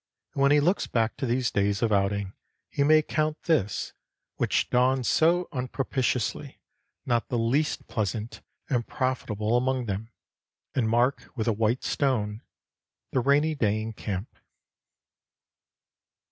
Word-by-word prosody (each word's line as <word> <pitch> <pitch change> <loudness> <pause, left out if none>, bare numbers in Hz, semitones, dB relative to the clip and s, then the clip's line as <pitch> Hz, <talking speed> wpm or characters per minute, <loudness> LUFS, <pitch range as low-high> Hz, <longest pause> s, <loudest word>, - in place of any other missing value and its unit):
And 135 - -2
when 140 - +5
he 145 - +6
looks 175 +7 +1
back 115 -1 0
to 135 -1 -2
these 125 +1 +1
days 100 +1 +1
of 115 - +2
outing 100 -1 0 0.4
he - - -1
may 155 +1 +5
count 155 0 -1
this, 140 - 0 0.4
which - - +1
dawned 125 +1 +3
so 170 +6 +3
unpropitiously, 125 -3 -2 0.5
not 120 -2 +1
the 120 - 0
least 130 +7 0
pleasant 110 +1 -3 0.3
and 120 -4 -1
profitable 115 -4 -1
among 130 0 +1
them, 105 +2 -4 0.6
and 115 -4 +1
mark 120 +4 +1
with 110 -3 -2
a 115 - +3
white 110 +4 0
stone 110 -6 0 0.7
the - - +1
rainy 145 +5 +3
day 110 -7 +1
in 110 +1 -4
camp. 100 0 -5
120 Hz, 135 wpm, -27 LUFS, 110-135 Hz, 0.7 s, he